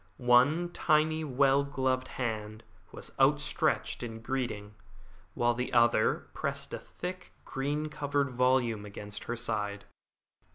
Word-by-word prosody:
One 130 +8 +4
tiny 155 -1 +2
well 140 0 +3
gloved 130 -2 -1
hand 110 -2 -4 0.3
was - - -9
outstretched - - +2
in 115 -2 -6
greeting, 115 -5 -3 0.6
while 120 0 +2
the 125 +1 -3
other 120 -2 +3
pressed - - -3
a - - -3
thick, 185 +1 -7
green 145 +3 -2
covered 145 -2 -1
volume 125 -3 +2
against 105 0 -8
her 120 - -2
side. 105 -4 -3
125 Hz, 120 wpm, -30 LUFS, 115-140 Hz, 0.6 s, One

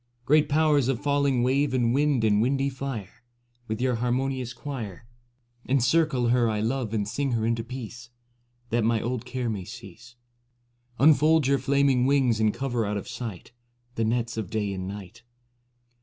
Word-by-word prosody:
Great 150 +2 +4
Powers 150 -3 +3
of 135 -3 0
falling 140 -3 +1
wave 135 +1 +1
and 120 -2 +2
wind 140 -3 +2
and 105 -1 +3
windy 135 +3 +1
fire, 125 -5 -6 0.5
With 110 0 -3
your 125 -1 +1
harmonious 125 +1 -1
choir 120 -6 -7 0.6
57 130 - +2
Encircle 135 -1 +2
her 120 -1 +3
I 105 -1 -1
love 115 +1 -1
and 105 -3 -1
sing 135 +4 -2
her 110 -1 0
into 115 0 0
peace. 120 -1 -8 0.6
That 115 0 +1
my 115 0 +2
old 120 +2 -3
care 125 0 -3
may 105 -4 -3
cease; 115 +3 -12 0.8
Unfold 155 +1 +5
your 140 0 +2
flaming 135 -1 +2
wings 130 -5 +2
and 110 -1 +3
cover 120 -1 -2
out 105 0 -2
of 100 - -6
sight 115 -6 -7 0.4
The 115 - -1
nets 115 +1 -1
of 105 -5 -3
day 105 -2 -2
and 95 -1 -5
night. 100 -2 -9
120 Hz, 170 wpm, -26 LUFS, 110-135 Hz, 0.8 s, Unfold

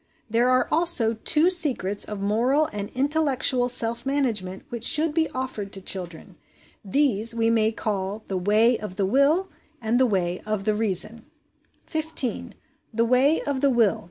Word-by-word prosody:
There 235 +2 +1
are 255 0 +2
also 320 -9 +3
two 305 +10 +1
secrets 255 - +2
of 210 -1 -7
moral 235 +9 +1
and 205 -1 -5
intellectual 270 -3 0
self 235 -1 +2
management 230 -9 -2
which 235 -2 -6
should 305 +5 +4
be 320 0 0
offered 255 -6 -6
to 195 - -6
children; 180 -3 -5 0.5
these 230 0 +2
we 230 0 +1
may 220 -1 +2
call 210 -1 -4
the 195 - -5
Way 215 +5 +2
of 205 -3 -8
the 200 -1 -1
Will 280 - +2 0.3
and 235 +1 0
the 260 - +3
Way 180 -4 -2
of 215 -2 -3
the 215 - 0
Reason. 220 +1 -2 0.6
15. 315 -6 -3 0.4
The 230 0 0
Way 260 +6 +2
of 280 -2 -3
the 280 - +3
Will. 230 -6 +2
230 Hz, 160 wpm, -23 LUFS, 210-275 Hz, 0.6 s, should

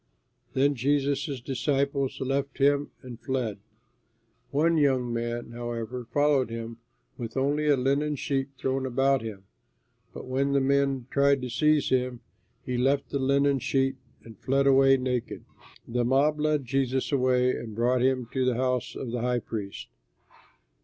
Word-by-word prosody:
Then 140 +2 +3
Jesus' 140 +1 0
disciples 140 +1 -1
left 135 +1 -2
him 145 +1 +2
and 125 -2 -9
fled. 125 -6 -2 0.9
One 160 +4 +2
young 130 -4 +2
man, 120 0 -3
however, 120 0 -5
followed 145 -2 +2
him 115 0 -6 0.4
with 115 +1 -5
only 145 +3 +1
a 145 -2 +4
linen 140 +3 +1
sheet 135 0 -1
thrown 135 0 -1
about 135 +1 +2
him; 105 -4 -7 0.7
but - - -9
when 135 +2 0
the 140 - +4
men 135 -1 +1
tried 140 0 +3
to 125 - -4
seize 150 +4 +2
him, 125 -2 0 0.4
he 125 -1 -2
left 135 +2 +1
the 140 - -1
linen 140 +1 +2
sheet 135 +1 0 0.3
and 110 -3 -13
fled 135 +1 +1
away 135 0 +5
naked. 125 -2 -3 0.4
The 120 +1 0
mob 140 +5 +2
led 150 -2 +1
Jesus 130 +1 -1
away 125 -2 +3
and 110 -3 -7
brought 120 +2 +2
him 130 -2 +1
to 130 - +1
the 125 -1 +1
house 125 0 -1
of 125 - -5
the 120 -1 -2
high 125 0 +1
priest. 100 -3 -6
130 Hz, 155 wpm, -27 LUFS, 125-140 Hz, 0.9 s, away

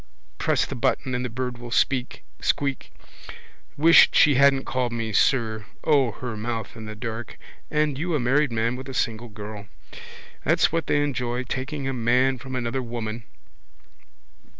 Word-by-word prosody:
Press - - +2
the - - -6
button 130 - -1
and 125 0 -1
the 125 - -3
bird 125 +1 -4
will 120 0 -8
squeak. 130 +1 0 1.5
Wish 165 +3 +7
she 150 - +5
hadn't 135 0 +4
called 125 -2 -1
me 115 -2 -3
sir. 110 -3 +1 0.2
O, 140 -5 +3
her 125 -3 -6
mouth 115 +1 -4
in 110 -1 -8
the 105 0 -7
dark! 115 0 -6 0.3
And 150 -2 0
you 170 +1 -1
a - - +1
married 135 +3 +2
man 115 +2 0
with 130 +1 -8
a 130 - -6
single 115 0 -2
girl! 105 -1 -8 0.8
That's - - +3
what 165 -1 -1
they 145 - +2
enjoy. 125 -3 -2
Taking 135 +2 -4
a 135 - -1
man 125 +2 +2
from 130 0 -7
another 125 +1 -2
woman. 115 -2 -5
125 Hz, 160 wpm, -24 LUFS, 115-135 Hz, 1.5 s, Wish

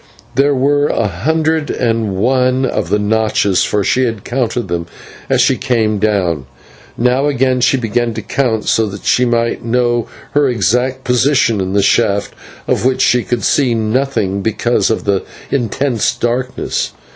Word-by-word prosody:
There 140 +2 +2
were 145 +2 +2
a 115 - 0
hundred 155 - -1
and 115 -5 -1
one 130 +4 +1
of 125 - -2
the 105 - +2
notches, 105 -2 +1
for 105 -1 0
she 130 +6 +2
had 115 -4 -3
counted 120 -1 -2
them 85 -1 -3 0.4
as - - +3
she - - +3
came 110 -4 0
down, 90 -10 0 0.5
and 120 - -2
now 130 +3 +2
again 130 -2 +1
she 135 - +3
began 115 -1 -1
to 110 - -5
count, 110 -1 -1
so 110 -1 +2
that 100 -1 -8
she 125 - +3
might 115 -1 0
know 120 0 0 0.2
her 145 -2 +2
exact 125 +4 0
position 125 -4 +2
in 95 0 -3
the 100 -1 +2
shaft, 100 +1 +1 0.3
of - - 0
which 130 0 +2
she 125 - +3
could 120 -2 -2
see 130 -5 +2
nothing 110 -3 -1
because 110 +3 0
of 110 - -1
the 100 -2 0 0.3
intense 125 -1 0
darkness. 125 +2 -2
120 Hz, 165 wpm, -15 LUFS, 105-130 Hz, 0.5 s, as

